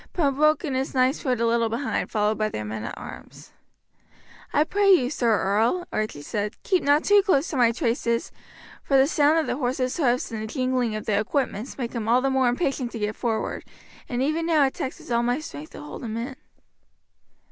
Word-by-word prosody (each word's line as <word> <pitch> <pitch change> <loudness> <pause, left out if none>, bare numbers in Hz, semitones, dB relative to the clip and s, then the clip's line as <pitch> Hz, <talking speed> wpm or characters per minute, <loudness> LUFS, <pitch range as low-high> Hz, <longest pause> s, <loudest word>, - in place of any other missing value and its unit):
Pembroke 305 -1 +2
and 280 -6 -2
his 265 +1 -2
knights 255 +2 +2
rode 250 -4 0
a 235 - +2
little 230 0 +2
behind, 240 +5 -2
followed 210 0 +1
by 215 0 +1
their 105 - -5
men 105 0 -5
at - - -6
arms. - - -11 1.0
"I 295 - +3
pray 400 +5 +1
you, 260 -9 +4
Sir 230 -8 +2
Earl," 225 - +1
Archie 215 -9 -3
said, 210 +5 -3
"keep 370 -4 +2
not 290 +2 +3
too 410 0 +5
close 355 -7 +2
to - - -4
my 240 -2 +5
traces, 235 -1 -1 0.5
for 275 - +2
the 265 - +6
sound 300 +1 +3
of 320 - +2
the - - -2
horse's 255 -1 -1
hoofs 250 -7 +1
and 220 -1 -4
the 220 - -4
jingling 255 -2 -1
of 215 - -5
the 205 -2 +1
equipments 240 0 -2
make 240 -3 -4
him 230 -3 -3
all 240 +2 +4
the 270 +1 +1
more 265 -2 +3
impatient 255 -1 -1
to - - -4
get 210 0 -2
forward, 225 -3 -2 0.5
and 245 0 -1
even 320 +4 0
now 310 -4 +4
it 265 - -1
taxes 260 -1 -6
all 235 0 +3
my 245 +1 +1
strength 155 - -9
to - - -9
hold 150 +9 -8
him 225 -1 -4
in." 250 +3 -4
250 Hz, 210 wpm, -25 LUFS, 225-285 Hz, 1.0 s, the